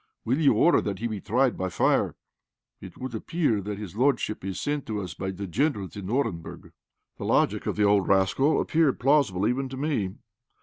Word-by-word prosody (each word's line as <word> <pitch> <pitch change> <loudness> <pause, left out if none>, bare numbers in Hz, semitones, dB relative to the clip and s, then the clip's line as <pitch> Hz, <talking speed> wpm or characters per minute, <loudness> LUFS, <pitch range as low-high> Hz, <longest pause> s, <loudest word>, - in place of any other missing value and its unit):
Will 130 +6 +1
you 150 -3 +4
order 175 - +4
that 100 - -3
he 115 - -5
be 110 -4 -3
tried 125 +3 +1
by 95 0 -2
fire? - - +1 0.6
It - - -11
would 130 -1 -6
appear 115 -2 0
that 100 +1 -5
his 105 -2 -8
lordship 125 -4 0
is 95 0 -4
sent 145 -1 -2
to 110 -2 -2
us 90 -4 -5
by 95 +3 -4
the 95 +1 -5
Generals 100 - -1
in 100 -2 -6
Orenburg." 110 -10 -3 0.5
The - - -5
logic - - +1
of - - -1
the 105 - +1
old 100 -1 +3
rascal 100 +10 +3
appeared 155 -4 +2
plausible 125 -9 +2
even 130 +3 -1
to 130 - -7
me. 130 -10 -1
110 Hz, 200 wpm, -26 LUFS, 95-135 Hz, 0.6 s, you